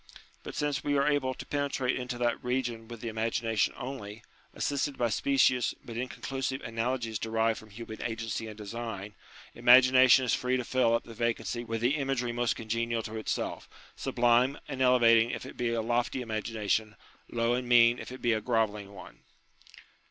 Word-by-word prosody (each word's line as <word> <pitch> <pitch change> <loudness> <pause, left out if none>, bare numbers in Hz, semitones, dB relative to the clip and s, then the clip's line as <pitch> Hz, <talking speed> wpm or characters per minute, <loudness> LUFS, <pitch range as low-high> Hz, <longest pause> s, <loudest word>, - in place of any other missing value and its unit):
But - - -8
since 145 -1 -1
we 145 -1 +1
are 140 - +2
able 140 -3 +1
to - - -8
penetrate 140 -3 -1
into 125 -1 -4
that 120 -1 -1
region 120 -2 -2
with 115 -1 -9
the 120 - -5
imagination 115 0 0
only, 115 -5 -7 0.3
assisted 140 0 -2
by 120 -1 +1
specious 125 +1 +2
but 115 - -8
inconclusive 130 +2 -3
analogies 115 -1 -2
derived 115 0 0
from 110 - -15
human 110 +1 -9
agency 115 -1 -3
and 105 -1 -9
design, 105 -1 -6 0.4
imagination 130 +1 +6
is 120 - +1
free 125 0 +1
to 125 - -2
fill 120 -2 +2
up - - -1
the 115 - -11
vacancy 120 +1 -2
with 115 -1 -4
the 130 +6 +2
imagery 135 -4 -1
most 120 0 0
congenial 115 0 -2
to 110 +1 -6
itself; 110 - -3 0.3
sublime 120 +3 +2
and 135 -2 -5
elevating 120 -3 +5
if - - -5
it - - -9
be 120 -1 -1
a 115 -1 -1
lofty 120 +3 0
imagina 110 -1 -4
tion, 110 +1 +1 0.3
low 115 0 +1
and 125 0 -2
mean 120 0 +6
if - - -8
it 130 - -10
be 120 -1 +3
a 110 - -1
grovelling 105 -3 -1
one. 95 - -12
120 Hz, 180 wpm, -29 LUFS, 115-130 Hz, 0.4 s, imagination